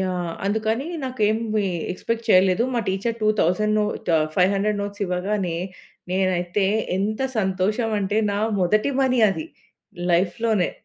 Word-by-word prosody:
Yeah! 180 -2 -2 0.2
అందుకని 220 +6 0 0.2
నాకు 255 -3 -6
ఏమి 215 -1 0 0.3
ఎక్స్‌పెక్ట్ 230 +4 -3
చేయలేదు. 185 +2 +5
మా 235 - +2
టీచర్ 205 +5 -1
2,000 215 0 +2 0.4
ఆహ్, 155 0 +2
500 200 +3 +2
నోట్స్ 205 0 -5
ఇవ్వగానే, 180 -1 -1 0.6
నేనైతే 185 +1 0 0.3
ఎంత 215 +4 -1 0.2
సంతోషమంటే, 205 +2 0
నా 200 - -1 0.2
మొదటి 215 +9 +2
మనీ 255 -2 +2
అది 315 +11 -4 0.7
లైఫ్‌లోనే. 195 +3 +1
205 Hz, 115 wpm, -23 LUFS, 185-220 Hz, 0.7 s, చేయలేదు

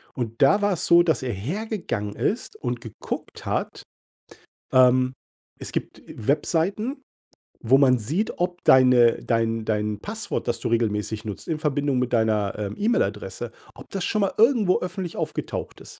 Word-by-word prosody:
Und 115 -3 -4
da 170 +10 +5
war 205 -1 +2
es 170 - -3
so, 170 0 +6
dass 160 -3 +1
er 125 - -2
hergegangen 140 - -4
ist 225 - -2
und 120 -2 -3
geguckt 115 -4 -7
hat - - -3 0.9
ähm, 130 0 +5 0.5
es - - -7
gibt, - - -4
äh, - - -13
Webseiten, 195 - 0 0.6
wo 125 +3 +4
man 130 -2 +5
sieht, 155 - -2
ob 175 0 -2
deine 125 -2 +6
dein 115 -1 0
dein 105 -1 -1
Passwort, 215 0 -4
das 120 -1 -1
du - - -2
regelmäßig 110 -1 -1
nutzt 105 -2 -7
in 155 -2 -1
Verbindung 145 -3 0
mit 125 -1 -2
deiner, 110 -3 +1
ähm, 105 -1 -4
E-Mail-Adresse, 110 - -1 0.2
ob - - -13
das 195 -2 -3
schon 215 - 0
mal 195 - +1
irgendwo 225 -5 +4
öffentlich 180 -1 -5
aufgetaucht - - -4
ist. - - -13
130 Hz, 160 wpm, -24 LUFS, 115-180 Hz, 0.9 s, so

